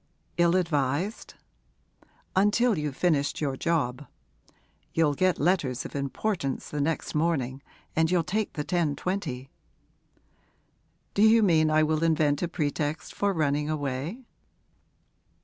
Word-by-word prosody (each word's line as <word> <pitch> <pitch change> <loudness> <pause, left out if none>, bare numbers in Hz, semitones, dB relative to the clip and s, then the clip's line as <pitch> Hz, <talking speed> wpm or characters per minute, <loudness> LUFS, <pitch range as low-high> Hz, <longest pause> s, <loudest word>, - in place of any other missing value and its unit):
'Ill 170 0 +4
advised?' 165 +3 -1 1.0
'Until 210 +4 +3
you've 150 -4 -3
finished 150 -5 +1
your 140 -3 -1
job. 145 -4 -1 0.9
You'll 160 -3 +3
get 185 +4 +2
letters 145 -7 0
of - - -8
importance 140 +1 -2
the 150 - -2
next 160 +3 -1
morning, 140 -5 0 0.3
and 160 0 +3
you'll 175 -1 +2
take 210 +4 -2
the 150 - -4
10.20.' 155 -4 -2 1.6
'Do 200 - +1
you 220 +1 +6
mean 160 -5 +4
I 155 0 +4
will 155 0 +1
invent 155 -3 +2
a 175 - 0
pretext 150 -2 -2
for 200 0 +1
running 150 -3 0
away?' 150 - -3
155 Hz, 120 wpm, -27 LUFS, 145-180 Hz, 1.6 s, you